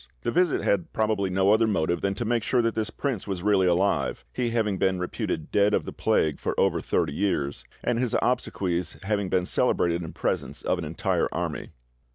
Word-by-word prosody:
This 120 - -1
visit 175 -1 +2
had 95 -4 +1
probably 110 -3 +1
no 95 +2 +3
other 110 +1 +4
motive 85 -5 0
than 100 0 0
to 120 - -3
make 120 +1 +1
sure 120 +2 +1
that 115 -1 +1
this 110 -1 -2
prince 125 -5 -3
was 95 -3 -3
really 100 -3 +3
alive, 90 +3 +1
he 125 -2 -1
having 110 -4 0
been 95 -1 +2
reputed 90 -3 -3
dead 105 +1 +3
of - - -1
the - - -6
plague 75 -2 +1
for - - -2
over - - +2
thirty 80 -4 0
years, 70 -8 -1 0.2
and 120 -1 +1
his 125 -2 0
obsequies 90 -9 -1
having 100 -1 -1
been 90 -1 +1
celebrated 85 -1 +1
in 80 - -6
presence - - -3
of 90 - 0
an 85 - -4
entire 75 +1 0
army. - - -3
100 Hz, 205 wpm, -26 LUFS, 90-110 Hz, 0.2 s, other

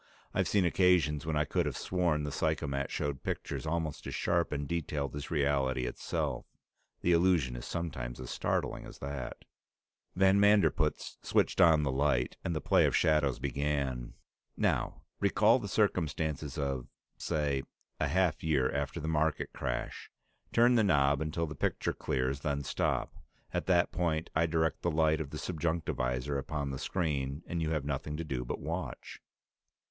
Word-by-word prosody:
I've - - +1
seen 100 -3 +3
occasions 85 -4 +3
when 80 - 0
I 75 0 +2
could - - 0
have - - -3
sworn 85 -5 0
the 75 - -3
psychomat 70 0 -1
showed 70 -2 -2
pictures 80 - -4
almost 80 -2 -2
as - - -4
sharp 85 -1 +1
and 70 -1 -2
detailed 75 -4 -2
as 75 0 -5
reality 70 -4 +1
itself; - - -3 0.5
the 90 - +2
illusion 85 -7 +3
is - - -6
sometimes 65 -8 -4
as 65 -1 -6
startling - - -1
as - - -11
that. 70 -3 -6 0.7
Van 95 +1 +5
Manderpootz 100 -7 +3
switched - - +2
on 80 -3 +6
the 70 - +1
light, 65 -2 +1
and 85 -3 -1
the - - 0
play - - +4
of - - 0
shadows 75 -4 +3
began. 70 -2 -2 0.4
"Now - - 0 0.2
recall 110 +4 +4
the 100 - -5
circumstances 80 - 0
of, 70 -4 -2 0.3
say, 75 -3 -1 0.4
a 75 - +1
half 90 0 +1
year 70 -5 +2
after - - -2
the 80 - -4
market 80 -1 0
crash. 60 0 -4 0.4
Turn 120 +2 +5
the 115 -2 +4
knob 70 -6 +3
until 80 +2 -1
the 75 - -6
picture 70 - -1
clears, 65 +2 -1
then 70 0 -2
stop. - - -1 0.4
At - - -2
that 90 -2 +3
point 85 -2 -1
I 80 +1 +2
direct 80 0 0
the 85 - +1
light 80 -1 +2
of 75 - -5
the 75 - -6
subjunctivisor 75 -6 -1
upon 70 0 -3
the 65 - -5
screen, 70 -4 -2
and 85 -1 -3
you 80 - 0
have 75 -3 -1
nothing 75 +1 -3
to 85 - -3
do 65 -6 -3
but - - -4
watch." - - -5
75 Hz, 165 wpm, -31 LUFS, 70-85 Hz, 0.7 s, on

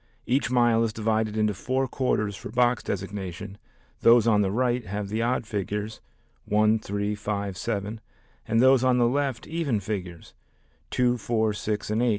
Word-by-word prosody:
Each 130 +2 +1
mile 120 -2 +3
is 110 -2 -1
divided 110 0 0
into 105 -1 +2
four 130 +7 -1
quarters 105 -6 -1
for 100 - -8
box 120 +1 +2
designation, 100 0 -5 0.4
those 115 0 +6
on 105 -3 +4
the 100 - +1
right 120 +3 0
have 100 +1 -4
the 110 +2 -1
odd 120 0 0
figures 105 +1 -4 0.4
1, 110 +1 +3
3, 100 0 -2
5, 100 -2 -3
7, 105 +3 -3 0.5
and 115 +1 +2
those 130 0 +5
on 130 -1 +3
the 120 -1 +4
left 135 -2 -1
even 155 -9 -1
figures 95 -5 -6 0.6
2, 125 -1 +1
4, 110 -1 0
6, 105 0 -3
and 110 +2 +1
8. 125 - +3
110 Hz, 165 wpm, -26 LUFS, 105-120 Hz, 0.6 s, those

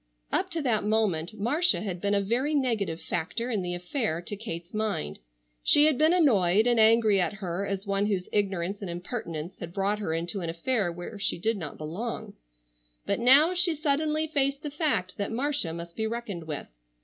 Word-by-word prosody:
Up 375 - 0
to 330 -4 -2
that 225 -6 +1
moment 210 -4 0
Marcia 305 - +4
had 185 -4 -5
been 205 0 +1
a 200 - +2
very 250 +9 0
negative 220 - 0
factor 180 +9 -3
in 210 -4 0
the 175 -1 -3
affair 180 - -1
to 175 +4 -5
Kate's 175 -4 -7
mind. 210 - -2 0.4
She 290 - +6
had 305 -5 +3
been 310 +1 +5
annoyed 215 - +4
and 240 -2 +3
angry 220 -3 +5
at 180 - 0
her 195 -1 -4
as 195 0 -3
one 200 0 0
whose 190 -3 -2
ignorance 195 -1 -1
and 195 - -5
impertinence 175 -2 -6
had 170 -1 -7
brought 200 +2 0
her 200 -6 -3
into 175 +4 -3
an 170 - -3
affair 185 +3 0
where 175 +4 -8
she 200 - +1
did 220 +6 0
not 160 -6 -6
belong, 175 +10 -5 0.7
but - - 0
now 275 +8 +6
she 355 -2 +5
suddenly 305 +1 0
faced 280 -2 0
the 295 - -4
fact 240 - -1
that 200 - -3
Marcia 270 - +1
must 170 +1 -8
be 220 0 -1
reckoned 220 -7 -5
with. 150 -2 -4
205 Hz, 195 wpm, -27 LUFS, 175-255 Hz, 0.7 s, She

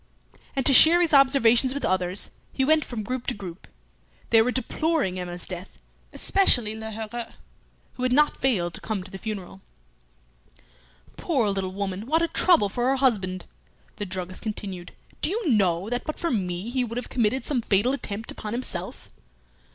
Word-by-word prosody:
And 270 - -1
to 275 - +6
share 325 +6 +8
his 340 -3 +1
observations 260 -2 +5
with 280 - -2
others 185 +1 +2 0.2
he 265 - 0
went 310 +1 +3
from 230 -4 -6
group 250 +3 -5
to - - -1
group. 185 -3 -10 0.6
They 225 -1 +7
were 235 - +1
deploring 260 - -1
Emma's 175 -1 -5
death, 180 0 -8 0.3
especially 245 - +4
Lheureux, 220 +1 -6 0.6
who - - -10
had 255 0 +1
not 295 +3 +3
failed 185 -10 0
to - - -8
come 215 -4 -3
to 185 - -12
the 190 - -8
funeral. 195 -3 -7 1.6
"Poor 250 -11 0
little 195 -1 -3
woman! 195 +2 -4
What 320 +4 +2
a - - +2
trouble 335 - +3
for 240 +5 -2
her 270 - +2
husband!" 200 -9 0 0.5
The 205 - -5
druggist 185 0 -6
continued, 195 -5 -6 0.3
"Do - - +3
you 420 0 -2
know 190 -4 +2
that 245 0 -2
but 310 - -4
for 340 - -2
me 185 -1 -3
he 255 0 0
would 230 0 -5
have 245 - -5
committed 245 +2 0
some 265 -5 0
fatal 220 +4 +1
attempt 220 -5 -5
upon 210 0 -6
himself?" 250 +2 -5
225 Hz, 175 wpm, -25 LUFS, 190-265 Hz, 1.6 s, share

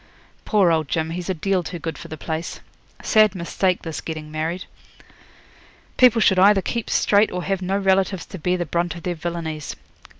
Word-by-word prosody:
'Poor 195 -5 +3
old 160 -2 +1
Jim, 160 +2 -1
he's 175 +2 -5
a - - +2
deal 190 +3 0
too 175 +1 -6
good 165 0 -5
for - - -10
the 155 - -7
place. 160 +2 -4 0.4
Sad 215 -3 +4
mistake 180 +1 -1
this 160 -2 -5
getting 155 -1 -6
married. 160 +4 -3 1.3
People 245 -3 +6
should 190 -3 +4
either 200 +1 +6
keep 235 -2 -3
straight 205 +1 +3
or 180 0 -3
have 195 0 -1
no 190 +2 0
relatives 190 -2 +1
to 190 - -9
bear 180 +3 0
the 175 - -2
brunt 170 +1 -1
of 170 - -10
their 180 - -1
villainies. 160 -2 -5
175 Hz, 190 wpm, -22 LUFS, 160-195 Hz, 1.3 s, People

